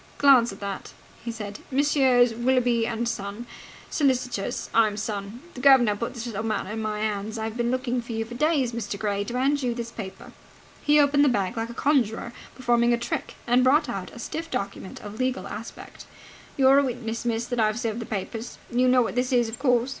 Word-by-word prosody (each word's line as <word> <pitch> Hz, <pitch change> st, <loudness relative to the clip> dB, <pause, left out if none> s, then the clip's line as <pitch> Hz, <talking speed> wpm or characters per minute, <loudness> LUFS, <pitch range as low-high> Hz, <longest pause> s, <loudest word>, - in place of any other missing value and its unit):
"Glance 260 Hz, -5 st, +6 dB
at 195 Hz, -, -10 dB
that," 200 Hz, -1 st, -5 dB, 0.3 s
he 235 Hz, -, -3 dB
said. 210 Hz, -2 st, -7 dB
"Messrs. 260 Hz, -4 st, +3 dB
Willoughby 240 Hz, -1 st, +2 dB
and 235 Hz, 0 st, -2 dB
Son, 205 Hz, 0 st, -4 dB, 0.5 s
Solicitors. 250 Hz, -7 st, 0 dB
I'm 215 Hz, -2 st, +3 dB
son. 210 Hz, +1 st, -4 dB
The 250 Hz, -, -8 dB
guv'nor 255 Hz, -6 st, +6 dB
put 235 Hz, +5 st, -4 dB
this 235 Hz, -1 st, -5 dB
little 220 Hz, -3 st, -4 dB
matter 220 Hz, -3 st, -2 dB
into 220 Hz, +1 st, -3 dB
my 215 Hz, -1 st, -2 dB
hands. 215 Hz, +1 st, -2 dB
I've 220 Hz, 0 st, -4 dB
been 240 Hz, 0 st, 0 dB
looking 255 Hz, -1 st, -1 dB
for 235 Hz, -, -9 dB
you 225 Hz, 0 st, -2 dB
for 235 Hz, -, -10 dB
days, 280 Hz, -2 st, +1 dB
Mr. 215 Hz, -4 st, -4 dB
Gray, 200 Hz, -1 st, -1 dB
to 240 Hz, +3 st, -4 dB
hand 280 Hz, +3 st, +2 dB
you 245 Hz, -2 st, -1 dB
this 235 Hz, -1 st, -5 dB
paper." 195 Hz, -5 st, -8 dB, 0.5 s
He 295 Hz, 0 st, +4 dB
opened 285 Hz, 0 st, +4 dB
the 285 Hz, -, +5 dB
bag 200 Hz, -6 st, 0 dB
like 225 Hz, 0 st, -3 dB
a 235 Hz, -, -8 dB
conjurer 235 Hz, -5 st, +1 dB, 0.2 s
performing 240 Hz, -2 st, +2 dB
a -, -, +2 dB
trick, 235 Hz, -, -4 dB
and 245 Hz, +1 st, +4 dB
brought 285 Hz, +2 st, +4 dB
out 195 Hz, -5 st, -4 dB
a -, -, -12 dB
stiff 320 Hz, +7 st, -5 dB
document 200 Hz, -5 st, -5 dB
of 210 Hz, +2 st, -9 dB
legal 255 Hz, -7 st, -1 dB
aspect. 215 Hz, +3 st, -9 dB, 0.5 s
"You're 270 Hz, 0 st, +6 dB
a -, -, +3 dB
witness, 230 Hz, -3 st, -3 dB
miss, 235 Hz, -1 st, -1 dB
that 245 Hz, -1 st, -3 dB
I've 215 Hz, 0 st, +2 dB
served 230 Hz, -2 st, -2 dB
the 230 Hz, -, -6 dB
papers. 220 Hz, +3 st, -5 dB
You 250 Hz, +1 st, +3 dB
know 250 Hz, 0 st, +5 dB
what -, -, -3 dB
this 250 Hz, +2 st, 0 dB
is, 240 Hz, -3 st, +3 dB
of 225 Hz, -, -7 dB
course?" 250 Hz, -2 st, +2 dB
235 Hz, 210 wpm, -25 LUFS, 220-255 Hz, 0.5 s, Glance